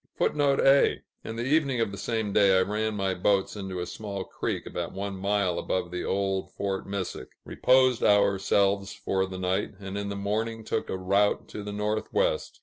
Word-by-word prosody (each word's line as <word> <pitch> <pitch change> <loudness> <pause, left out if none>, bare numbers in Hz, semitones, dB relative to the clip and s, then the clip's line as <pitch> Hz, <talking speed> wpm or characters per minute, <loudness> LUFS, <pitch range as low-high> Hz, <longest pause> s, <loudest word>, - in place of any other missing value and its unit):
[Footnote 145 -2 +2
A: 135 +1 +4 0.2
"In 110 - -6
the 115 +1 -3
evening 140 -3 +2
of 115 -3 0
the 100 - -7
same 110 0 -2
day 100 -2 +5
I 95 - +4
ran 105 +2 -1
my 95 -2 0
Boats 95 +2 +1
into 95 -3 -5
a 90 - -2
small 100 0 -5
Creek - - -4
about 85 -1 -5
one 100 +1 -4
mile 100 -1 0
above 90 -2 -2
the 90 - -3
old 95 -1 -1
Fort 100 -1 -3
Missack; 95 -9 -4 0.2
Reposed 130 -1 +3
ourselves 100 -1 +3
for 95 0 -1
the 95 0 -7
night, 95 +2 -1
and 100 0 -5
in 100 0 -3
the 100 - -4
morning 110 +3 -2
took - - -2
a - - -2
Rout 100 +2 +1
to 105 - -6
the 105 0 -6
Northwest." 110 - -1
100 Hz, 190 wpm, -27 LUFS, 95-110 Hz, 0.2 s, day